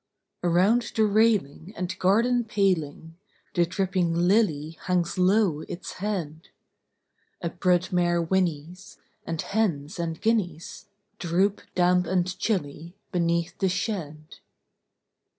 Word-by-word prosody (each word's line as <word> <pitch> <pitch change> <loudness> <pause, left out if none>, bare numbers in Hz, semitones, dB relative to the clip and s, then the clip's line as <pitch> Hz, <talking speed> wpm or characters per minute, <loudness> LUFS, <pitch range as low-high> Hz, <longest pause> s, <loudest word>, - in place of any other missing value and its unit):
Around 190 +8 +2
the 220 - +4
railing 205 -5 +1
and 180 0 -4
garden 235 +6 +3
paling 170 -7 -1 0.4
The 175 -2 +2
dripping 185 -2 0
lily 170 -4 +1
hangs 180 0 0
low 185 -4 +3
its 175 -1 -6
head: 170 -7 -4 0.9
A 170 - -3
brood 180 +1 +1
mare 175 -1 +2
whinnies; 175 0 -2 0.3
and 165 -1 -3
hens 180 -6 -1
and 165 -1 -3
guineas 180 -8 -2 0.3
Droop, 190 +3 +1
damp 180 0 +3
and 180 0 +1
chilly, 170 -4 -3 0.2
beneath 170 -2 0
the 190 - +2
shed. 165 -6 -4
180 Hz, 110 wpm, -26 LUFS, 165-200 Hz, 0.9 s, the